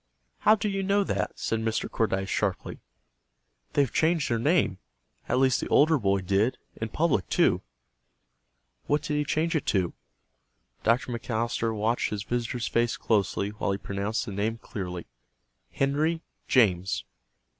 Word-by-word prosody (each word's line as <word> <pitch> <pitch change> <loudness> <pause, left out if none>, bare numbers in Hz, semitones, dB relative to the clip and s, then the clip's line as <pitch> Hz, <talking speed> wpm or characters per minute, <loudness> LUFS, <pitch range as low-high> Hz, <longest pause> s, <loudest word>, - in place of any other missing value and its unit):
"How 215 - +6
do 210 0 -2
you 195 -1 -1
know 200 +1 +2
that?" - - -2
said 115 - -1
Mr. 110 0 -1
Cordyce, 95 -4 0
sharply. 100 -2 -2 0.9
"They've 140 -4 +2
changed 160 -4 +2
their 115 - +1
name. 130 - +2 0.5
At - - +2
least 130 -1 +3
the - - -3
older 155 0 +4
boy 100 -3 +1
did. 100 +6 +1 0.2
In 110 - -4
public, 140 - +1
too." - - +3 1.3
"What 145 0 +1
did 150 - -2
he 150 - +2
change 160 +3 0
it 155 - -1
to?" 95 -4 +1 0.9
Dr. 120 +2 +2
McAllister 115 -1 -1
watched 110 +3 +1
his 105 -1 -3
visitor's 120 +1 -2
face 120 0 +1
closely 100 -2 +1
while 105 -1 -2
he - - -2
pronounced 100 +2 -2
the - - -6
name 105 +3 -1
clearly, 90 -6 -6 0.7
"Henry 155 +4 0 0.2
James." 90 - +3
115 Hz, 145 wpm, -27 LUFS, 100-145 Hz, 1.3 s, How